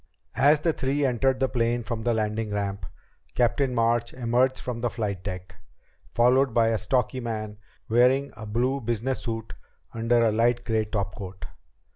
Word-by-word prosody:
As 145 +2 +5
the 165 0 +1
three 140 +1 0
entered 130 +1 +1
the 130 - +2
plane 120 -1 0
from 115 0 -4
the 120 +1 +1
landing 110 0 -1
ramp, 100 -3 -3 0.5
Captain 125 +2 +1
March 115 0 +1
emerged 125 +2 +1
from 120 -2 -5
the 120 - 0
flight 105 -6 -3
deck, 90 -2 -7 0.5
followed 125 +1 +3
by 115 -1 +4
a 110 -1 0
stocky 125 +3 0
man 110 -3 -5 0.3
wearing 125 +4 +3
a 110 -1 -8
blue 125 +6 0
business 120 +3 -2
suit 115 -2 -5 0.4
under 115 +1 +2
a 110 - +3
light 120 +2 +1
gray 110 -2 +1
topcoat. 100 -2 -5
115 Hz, 160 wpm, -26 LUFS, 110-125 Hz, 0.5 s, As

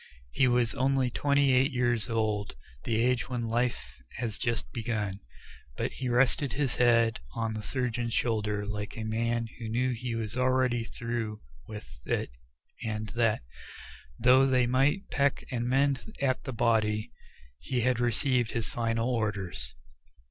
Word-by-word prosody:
He 135 - +3
was 120 -3 +2
only 130 -1 +1
twenty 140 +1 +3
eight 130 +3 +4
years 120 -3 0
old, 110 - -1 0.3
the 115 - 0
age 125 +1 +1
when 120 -2 -2
life 115 - -2
has 115 -3 -3
just 115 - -1
begun, 105 -4 -2 0.6
but - - -1
he 130 -2 -4
rested 130 +2 +2
his 140 -3 0
head 115 -2 +4 0.2
on 115 -1 -1
the 110 - -4
surgeon's 120 -1 -2
shoulder 105 -3 0
like 105 +1 -5
a 110 - -3
man 115 +1 0
who 115 -2 -5
knew 125 +3 +1
he 120 0 -3
was 110 0 -3
already 130 -2 +2
through 115 -2 -4 0.3
with 70 - -10
it - - -1 0.5
and 110 -1 -3
that, 115 - +1 0.7
though 130 +3 +6
they 130 -2 +3
might 135 +10 +2
peck 140 -1 +1
and 120 -2 -1
mend 135 - +1
at 135 -2 0
the 130 - -3
body, 110 -2 +1 0.5
he 125 - -1
had 125 0 +2
received 120 0 +1
his 115 -2 -2
final 115 0 0
orders. 100 - -2
120 Hz, 150 wpm, -29 LUFS, 110-125 Hz, 0.7 s, though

